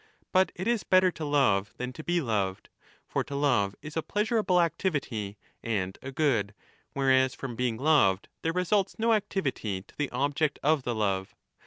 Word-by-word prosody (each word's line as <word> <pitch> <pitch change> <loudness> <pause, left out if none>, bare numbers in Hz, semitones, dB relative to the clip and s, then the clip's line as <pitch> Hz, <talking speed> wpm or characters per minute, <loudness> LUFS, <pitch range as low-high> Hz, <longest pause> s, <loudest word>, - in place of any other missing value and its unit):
But 185 0 +3
it 185 +4 -4
is 235 -3 +1
better 185 0 +4
to 160 - -7
love 115 -9 +2
than 125 0 -4
to 155 - -9
be 175 +1 +1
loved. 100 -7 -2 0.4
For - - -1
to 140 - -7
love 125 -9 +2
is 155 0 -8
a 160 - +1
pleasurable 210 0 0
Ictivity 145 - 0 0.3
and 95 -5 -2
a 135 - -6
good, 120 -9 +1 0.4
whereas 130 -1 +3
from 130 -4 -6
being 120 -2 -1
loved 130 -10 +3
there 165 - 0
results 185 +3 +1
o 230 +1 +3
activity 135 - -1
to - - -22
the 145 -2 -2
object 145 +3 0
of 150 0 +3
the 120 -2 -2
love. 95 -3 -1
140 Hz, 175 wpm, -28 LUFS, 110-170 Hz, 0.4 s, better